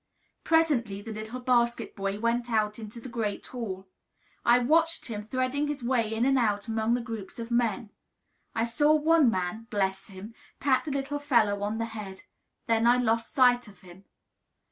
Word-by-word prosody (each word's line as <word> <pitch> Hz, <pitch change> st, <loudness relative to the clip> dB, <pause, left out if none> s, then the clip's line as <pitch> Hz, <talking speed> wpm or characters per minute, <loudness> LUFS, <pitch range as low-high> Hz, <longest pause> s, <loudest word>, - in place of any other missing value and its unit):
Presently 255 Hz, -12 st, +2 dB
the 225 Hz, -, -7 dB
little 220 Hz, +4 st, -6 dB
basket 240 Hz, -1 st, +1 dB
boy 195 Hz, 0 st, -3 dB
went 235 Hz, +2 st, 0 dB
out 215 Hz, -1 st, 0 dB
into 220 Hz, +1 st, -8 dB
the 235 Hz, -, -9 dB
great 225 Hz, -4 st, -3 dB
hall. 195 Hz, -6 st, -6 dB, 0.6 s
I 240 Hz, +1 st, +6 dB
watched 325 Hz, +6 st, +2 dB
him 215 Hz, -3 st, -4 dB
threading 255 Hz, +4 st, -1 dB
his 290 Hz, -3 st, -4 dB
way 235 Hz, -3 st, +1 dB
in 225 Hz, +2 st, 0 dB
and 270 Hz, 0 st, +3 dB
out 210 Hz, -3 st, 0 dB
among 225 Hz, +1 st, +1 dB
the 245 Hz, -, -2 dB
groups 225 Hz, -5 st, -7 dB
of 230 Hz, 0 st, -6 dB
men. 235 Hz, -3 st, 0 dB, 0.6 s
I 225 Hz, 0 st, +1 dB
saw 295 Hz, +6 st, +3 dB
one 310 Hz, -2 st, +4 dB
man 200 Hz, +3 st, -3 dB
bless 195 Hz, -3 st, -1 dB
him! 200 Hz, +2 st, -10 dB, 0.3 s
pat 270 Hz, -2 st, +2 dB
the 300 Hz, -, -3 dB
little 275 Hz, +1 st, -2 dB
fellow 230 Hz, -8 st, +2 dB
on 210 Hz, +2 st, -2 dB
the 230 Hz, -, -1 dB
head; 210 Hz, -4 st, -8 dB, 0.4 s
then 230 Hz, 0 st, +2 dB
I 245 Hz, +1 st, +5 dB
lost 230 Hz, -2 st, 0 dB
sight 245 Hz, -2 st, +4 dB
of 195 Hz, -3 st, -16 dB
him. 185 Hz, +1 st, -15 dB
230 Hz, 180 wpm, -28 LUFS, 210-255 Hz, 0.6 s, I